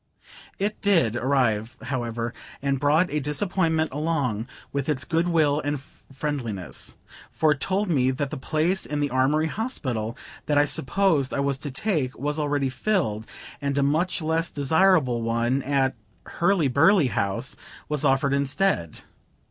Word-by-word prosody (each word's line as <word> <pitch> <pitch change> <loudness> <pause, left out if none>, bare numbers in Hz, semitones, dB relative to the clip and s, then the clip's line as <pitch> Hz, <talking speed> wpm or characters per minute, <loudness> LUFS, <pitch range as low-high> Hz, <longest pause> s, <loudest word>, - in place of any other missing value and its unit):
It 205 +2 -2
did 165 - +3
arrive 120 -3 0
however, 120 -3 -3 0.3
and 140 -1 -1
brought 150 +6 +3
a 150 - +1
disappointment 160 +2 0
along 140 -7 -1 0.3
with 140 +1 -2
its 130 -3 0
good 170 +1 +1
will 155 -4 +3
and 145 0 -2
friendliness, 130 - -4 0.3
for 155 -1 +2
it 145 - 0
told 195 +5 0
me 130 -7 +2
that 135 +1 -2
the - - -3
place 160 +8 0
in 150 0 -2
the 145 -1 0
Armory 135 +5 +2
Hospital 130 - -3 0.3
that 150 - +2
I 145 - +5
supposed 145 0 +1
I - - -1
was 140 -1 0
to 145 - -5
take, 140 -3 -1
was 150 +2 -2
already 145 -2 0
filled, 130 - -1 0.3
and 140 0 -1
a 140 - +3
much 160 +5 +1
less 160 +1 0
desirable 150 -4 +3
one 115 +3 0
at 135 -1 +1 0.3
Hurly 175 -3 +1
burly 140 +3 +4
House 100 -4 -1 0.3
was 150 -2 -1
offered 135 +1 +2
instead. 140 - 0
145 Hz, 150 wpm, -25 LUFS, 130-160 Hz, 0.3 s, I